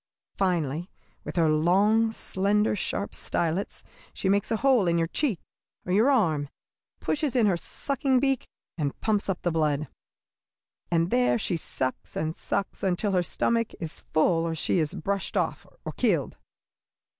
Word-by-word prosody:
Finally, 175 -3 0 0.3
with - - -6
her 165 -2 +3
long, 195 +9 +3
slender, 210 0 +1
sharp 200 0 -2
stylets, 170 +4 -2 0.3
she - - -2
makes 200 0 +2
a 225 - +1
hole 255 -6 +3
in 170 0 +2
your 165 - +2
cheek 210 - -1 0.5
or 180 - -1
your 220 +8 +4
arm, 160 - +2 0.5
pushes 295 -4 -1
in 240 -3 +4
her 195 -4 +3
sucking 265 +8 0
beak, 270 -1 0 0.3
and 145 -2 -2
pumps 210 -2 0
up 190 - 0
the 175 - +1
blood. 155 -2 0 1.0
And 170 0 +1
there 125 -1 +3
she 175 - -1
sucks 130 -5 -3
and 160 +1 -2
sucks 200 - -3
until 195 +2 0
her 185 -2 +3
stomach 230 +6 0
is 160 -2 -5
full 165 +1 +3
or 165 -1 -2
she 160 - +1
is 155 -2 0
brushed 195 +3 -2
off - - -1 0.2
or - - -3
killed." - - 0
185 Hz, 155 wpm, -27 LUFS, 160-215 Hz, 1.0 s, your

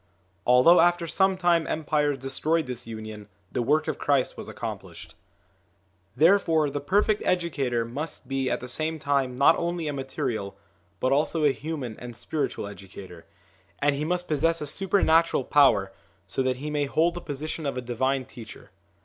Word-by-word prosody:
Although 125 +8 +7
after 175 0 +3
some 190 +3 +2
time 175 -2 +2
empires 150 -2 0
destroyed 150 +5 0
this 125 -2 -6
union, 110 -2 -8 0.2
the - - -1
work 150 +6 +1
of - - -3
Christ 140 -3 +1
was - - -8
accom - - -5
plished. 80 0 -13 1.0
Therefore 160 -3 +3
the 145 - -3
perfect 205 +6 +2
educator 140 -10 0
must 145 +8 -6
be 135 -1 -1
at - - -2
the 125 - -7
same 155 +5 -2
time 140 -4 0
not 140 +5 +5
only 170 -1 -2
a 145 - -2
material, 130 -7 -4 0.4
but 130 - +1
also 150 +3 +1
a 145 - +5
human 135 -6 -6
and 120 -1 -8
spiritual 145 -1 -3
educator; 95 -3 -11 0.5
and 145 0 +2
he 140 +2 -3
must 180 +2 -1
possess 165 +2 +1
a 150 - -4
supernatural 165 -3 +2
power, 125 -10 +4 0.4
so 95 - -1
that 130 -1 0
he 150 +3 -5
may 145 -1 0
hold 160 +5 +1
the 175 - -6
position 150 +1 -5
of 135 - -3
a - - 0
divine 130 +2 -1
teacher. 115 -3 -12
145 Hz, 170 wpm, -26 LUFS, 125-160 Hz, 1.0 s, Although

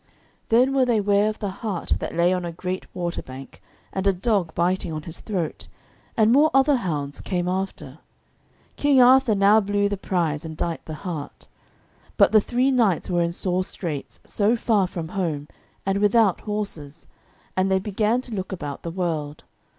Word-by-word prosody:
Then 250 +4 +4
were 270 -1 +3
they 240 -3 +2
ware 205 +1 +3
of 215 - -5
the 200 -2 -3
hart 200 -6 -1
that - - -5
lay 170 +2 +3
on 180 -1 -2
a 170 - -4
great 180 +2 -5
water 175 -2 -3
bank, 130 +1 -11 0.3
and 190 +1 -1
a - - +6
dog 190 -3 -1
biting 180 0 0
on 155 -1 -5
his 165 +1 -7
throat, 180 -7 -4 0.5
and 220 0 +4
more 290 +5 +5
other 270 +1 +5
hounds 145 - -3
came 180 -1 -2
after. 180 -6 -4 0.8
King 285 -2 +4
Arthur 255 -2 +6
now 200 +2 +5
blew 205 0 +1
the 200 0 -2
prize 165 -6 -1
and 160 -1 -7
dight 170 -1 -3
the 155 - -6
hart. 160 -6 -6 0.7
But - - +5
the 215 - +6
three 250 +5 +1
knights 215 -9 +1
were 175 -1 +2
in 170 0 0
sore 180 +1 -1
straits, 160 -6 -6
so 215 +3 +1
far 220 -5 +2
from 170 -3 -6
home, 160 -7 -2 0.4
and 195 +1 +1
without 205 -1 +3
horses, 200 -9 -5 0.5
and 185 +1 +1
they 190 - +3
began 210 +5 0
to 245 -3 -10
look 190 -2 -4
about 150 -7 -5
the 170 - -5
world. 165 -4 -3
190 Hz, 180 wpm, -24 LUFS, 170-215 Hz, 0.8 s, a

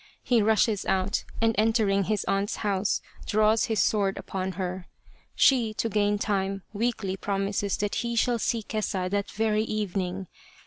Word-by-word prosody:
He 240 -3 +3
rushes 215 -1 +2
out 190 +1 0 0.2
and 225 0 +3
entering 215 -3 +2
his 215 0 0
aunt's 195 +1 0
house 195 0 0 0.2
draws 215 +1 +3
his 220 -2 -1
sword 200 -3 +2
upon 190 0 -4
her. 185 0 -4 0.5
She, 235 -5 +4
to 230 - -1
gain 205 0 +2
time, 195 -2 -1
weakly 220 -3 -1
pro 195 0 -2
mises 200 0 -1
that 205 0 -2
he 235 0 -1
shall 235 0 +2
see 225 0 -1
Kesa 200 -4 -2
that 200 0 -1
very 215 0 +1
evening. 195 -3 -2
205 Hz, 155 wpm, -27 LUFS, 195-220 Hz, 0.5 s, She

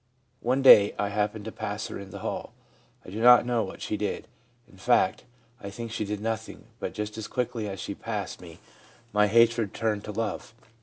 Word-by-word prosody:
One 130 +3 0
day 105 -6 +8
I 100 - 0
happened 105 +1 -2
to 110 - -5
pass 105 0 -4
her - - -6
in 100 -1 -9
the - - -9
hall. - - -4 0.5
I - - -10
do 110 +3 -4
not 125 0 +8
know 120 -2 +1
what 95 - -6
she 105 - -2
did. 105 - -3 0.4
In 95 - -19
fact, 110 +1 +2 0.4
I 100 - -6
think 115 +3 -7
she 110 -1 -2
did 105 0 -3
nothing, 110 0 -4 0.2
but - - -5
just 105 +1 -4
as 105 - -5
quickly 120 -4 -2
as 95 -1 -6
she - - -4
passed - - -5
me 85 -2 -12 0.6
my 105 0 +4
hatred 115 -1 +3
turned 105 -2 -1
to 105 - -5
love. 110 +1 -4
105 Hz, 205 wpm, -27 LUFS, 100-115 Hz, 0.6 s, day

